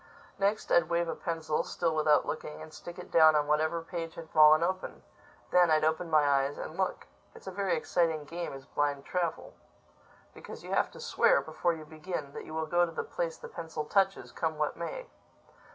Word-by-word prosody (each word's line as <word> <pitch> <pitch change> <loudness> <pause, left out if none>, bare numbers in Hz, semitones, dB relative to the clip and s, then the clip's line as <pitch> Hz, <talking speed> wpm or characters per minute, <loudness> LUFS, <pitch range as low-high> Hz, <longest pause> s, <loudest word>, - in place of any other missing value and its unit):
Next, 200 +2 0
I'd 170 -1 +4
wave 170 0 +1
a 165 - -2
pencil, 160 -2 -2
still 165 -2 -1
without 155 -1 +3
looking, 150 -1 -5
and 155 0 -10
stick 175 +2 -9
it 180 - -10
down 160 -1 +7
on 150 -1 +3
whatever 155 +2 +1
page 165 -1 -5
had 165 -1 -10
fallen 155 +1 +7
open. 185 +2 -3 0.5
Then 180 -1 +5
I'd 155 -1 +3
open 160 +2 0
my 155 -2 +4
eyes 140 0 +1
and 155 - -6
look. 190 0 -2 0.3
It's - - -14
a 190 - -5
very 190 -3 0
exciting 160 -1 0
game, 170 +3 -5
is 135 -1 -9
Blind 145 -1 -1
Travel. 175 -3 -2 0.8
Because - - -10
you - - -8
have - - +2
to - - -11
swear, - - +3
before 170 +2 -1
you 155 -1 -8
begin, 155 -2 -6
that - - -7
you 155 - -9
will 160 0 -1
go 175 +2 +2
to 170 - -1
the - - -3
place - - -3
the 480 - -9
pencil 160 - -6
touches, 195 +3 +1
come 160 -1 -2
what 150 -1 -1
may. - - -5
160 Hz, 205 wpm, -30 LUFS, 155-175 Hz, 0.8 s, down